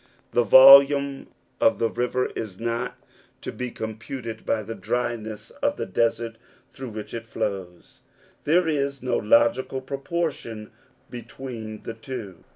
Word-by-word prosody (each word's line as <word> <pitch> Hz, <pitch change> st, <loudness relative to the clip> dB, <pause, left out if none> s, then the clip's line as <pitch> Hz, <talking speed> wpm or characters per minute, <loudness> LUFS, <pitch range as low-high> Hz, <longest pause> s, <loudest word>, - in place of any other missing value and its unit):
The 120 Hz, -, +3 dB
volume 140 Hz, +3 st, +7 dB, 0.3 s
of -, -, +4 dB
the 115 Hz, -, +1 dB
river 125 Hz, +1 st, -1 dB
is 100 Hz, -5 st, -6 dB
not 115 Hz, +2 st, -3 dB, 0.4 s
to -, -, -5 dB
be 125 Hz, 0 st, -5 dB
computed 115 Hz, +1 st, -7 dB
by 110 Hz, -1 st, 0 dB
the 115 Hz, -, -6 dB
dryness 115 Hz, -3 st, -4 dB
of -, -, +1 dB
the -, -, -3 dB
desert 115 Hz, +2 st, -1 dB, 0.3 s
through 130 Hz, -2 st, -8 dB
which 110 Hz, -1 st, -8 dB
it 115 Hz, -1 st, -6 dB
flows: 100 Hz, -6 st, -5 dB, 0.4 s
there 170 Hz, +3 st, +3 dB
is 140 Hz, -3 st, -1 dB
no 130 Hz, -, 0 dB
logical 115 Hz, +4 st, +2 dB
proportion 135 Hz, -5 st, -4 dB, 0.4 s
between 120 Hz, -3 st, -8 dB
the 115 Hz, -, -5 dB
two. 115 Hz, -5 st, -8 dB
115 Hz, 135 wpm, -24 LUFS, 110-130 Hz, 0.4 s, volume